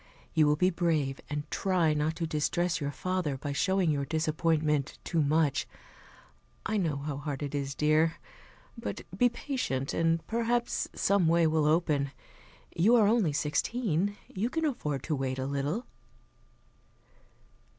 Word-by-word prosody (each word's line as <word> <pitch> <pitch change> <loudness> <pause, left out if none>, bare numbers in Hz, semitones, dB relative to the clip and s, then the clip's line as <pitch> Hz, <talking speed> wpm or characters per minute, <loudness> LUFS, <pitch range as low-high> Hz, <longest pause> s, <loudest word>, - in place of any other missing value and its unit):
You 155 -2 +4
will 150 - +4
be 180 +4 +2
brave, 155 -6 0
and 145 0 -2
try 180 -5 +2
not 150 +2 0
to 165 0 -2
distress 165 +2 0
your 145 - -1
father 175 -1 -2
by 145 +2 -4
showing 190 +3 +2
your 140 -2 0
disappointment 155 -1 0
too 165 - 0
much. 150 0 +2 1.0
I 215 - 0
know 165 -7 0
how 140 0 -4
hard 145 -1 -4
it 145 0 -4
is, 140 -1 -2
dear. 155 +2 +3 0.6
But 100 - -5
be 245 +5 +4
patient, 235 - -3
and 165 0 +1
perhaps 235 +1 0
some 200 -4 +2
way 170 0 +4
will 155 -1 +2
open. 150 -3 +2 0.7
You 215 +8 +5
are 225 -3 +5
only 210 -6 +3
sixteen, 195 - 0
you 215 +5 -2
can 320 +4 -1
afford 150 - -2
to 155 - -1
wait 135 -1 -2
a 130 - -2
little." 140 - -2
160 Hz, 150 wpm, -29 LUFS, 145-185 Hz, 1.0 s, You